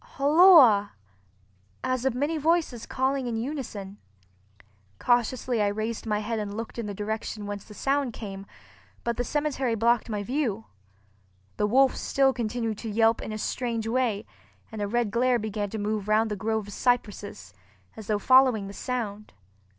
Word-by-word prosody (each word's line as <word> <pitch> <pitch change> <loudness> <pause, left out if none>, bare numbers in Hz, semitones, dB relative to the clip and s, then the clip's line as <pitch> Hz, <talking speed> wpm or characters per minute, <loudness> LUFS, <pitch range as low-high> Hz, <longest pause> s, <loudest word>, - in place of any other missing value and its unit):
holloa!" 280 - +6 0.9
as 255 0 -1
of 265 -3 +1
many 290 +5 0
voices 315 -6 0
calling 265 0 -1
in 230 -2 -2
unison. 225 -6 -5 1.0
Cautiously 240 -1 +1
I 205 - +3
raised 220 +3 -3
my 210 -1 0
head 225 +1 -2
and 205 0 -5
looked 230 +1 -6
in 225 - -3
the 205 - -5
direction 215 +1 -4
whence 205 -1 -6
the 210 - -13
sound 275 0 0
came, 200 -3 -8 0.6
but 235 -1 -2
the 245 - 0
cemetery 275 -4 -1
blocked 230 +1 +2
my 210 -2 -2
view. 230 -3 -2 0.9
The 210 - +1
wolf 265 +4 +4
still 270 -1 +2
continued 230 -2 -3
to 225 - -5
yelp 225 +1 +2
in - - -6
a 215 - -4
strange 230 0 -2
way, 225 -3 0 0.5
and 220 -1 -6
a 205 - -1
red 235 0 0
glare 245 +2 +2
began 210 -2 -3
to 220 - -5
move 210 -1 -2
round 215 +1 +2
the - - -1
grove 220 +1 -2
of 205 - -9
cypresses, 205 - -2 0.4
as 220 - -10
though 210 - +1
following 255 -2 +4
the 200 - -8
sound. 215 -4 -4
225 Hz, 165 wpm, -26 LUFS, 210-255 Hz, 1.0 s, holloa